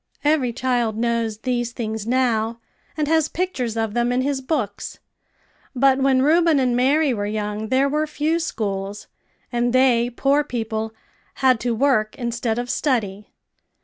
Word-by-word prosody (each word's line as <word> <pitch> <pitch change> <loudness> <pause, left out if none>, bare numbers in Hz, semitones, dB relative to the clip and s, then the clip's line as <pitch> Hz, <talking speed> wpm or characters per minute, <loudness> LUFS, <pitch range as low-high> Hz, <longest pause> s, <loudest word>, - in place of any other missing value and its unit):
Every 290 -5 +2
child 240 -3 -1
knows 230 -2 -1
these 240 0 -2
things 220 -2 -4
now, 235 -2 +1 0.4
and 300 -1 0
has 320 0 +2
pictures 255 -11 -2
of 225 -2 -1
them 240 +1 +1
in 250 +1 +1
his 275 0 -1
books; 255 -8 -3 0.8
but 265 +1 +4
when 265 -1 +3
Reuben 325 +1 +4
and 250 -2 +1
Mary 275 +3 +3
were 205 -2 -2
young 210 0 -3
there 260 +4 +2
were 300 +2 0
few 305 +2 0
schools; 200 -8 -3 0.5
and 240 0 0
they, 245 -2 +4
poor 275 +4 +2
people, 225 -4 -3 0.4
had 255 -3 +3
to 240 -1 -1
work 225 -4 +1
instead 235 -2 -2
of 245 0 -2
study. 210 -8 -1
245 Hz, 150 wpm, -22 LUFS, 225-275 Hz, 0.8 s, but